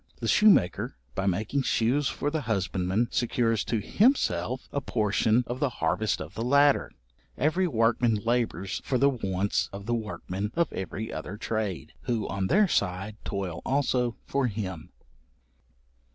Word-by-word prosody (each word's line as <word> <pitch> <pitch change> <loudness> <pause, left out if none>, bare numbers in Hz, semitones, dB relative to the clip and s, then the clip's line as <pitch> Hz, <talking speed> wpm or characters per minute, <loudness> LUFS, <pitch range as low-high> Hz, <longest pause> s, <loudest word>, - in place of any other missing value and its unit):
The - - -3
shoemaker, 210 - +4 0.2
by 95 - -2
making 110 +9 0
shoes 130 +3 +1
for 145 - -2
the 160 0 -1
husbandman, 95 -1 0
secures 115 -2 +1
to 115 - 0
himself 130 - +1
a 140 - -1
portion 110 0 +2
of 125 +1 -5
the 145 -2 +1
harvest 90 +6 0
of 80 +1 -7
the 110 - -5
latter. 140 +3 +4 0.5
Every 165 +7 +2
workman 115 -3 +2
labours 105 -4 -1
for 130 - 0
the 140 +3 +4
wants 100 -5 -1
of 100 0 -8
the 120 - -1
workmen 105 -1 -4
of 170 -2 +1
every 100 +3 -5
other 90 +6 -6
trade, 105 -5 -3
who, 115 -4 -1
on 95 -1 -2
their 210 - +4
side, 100 - -1
toil 95 -4 -4
also 125 -3 0
for 140 -2 0
him. 95 -7 -5
110 Hz, 150 wpm, -27 LUFS, 95-130 Hz, 0.5 s, shoemaker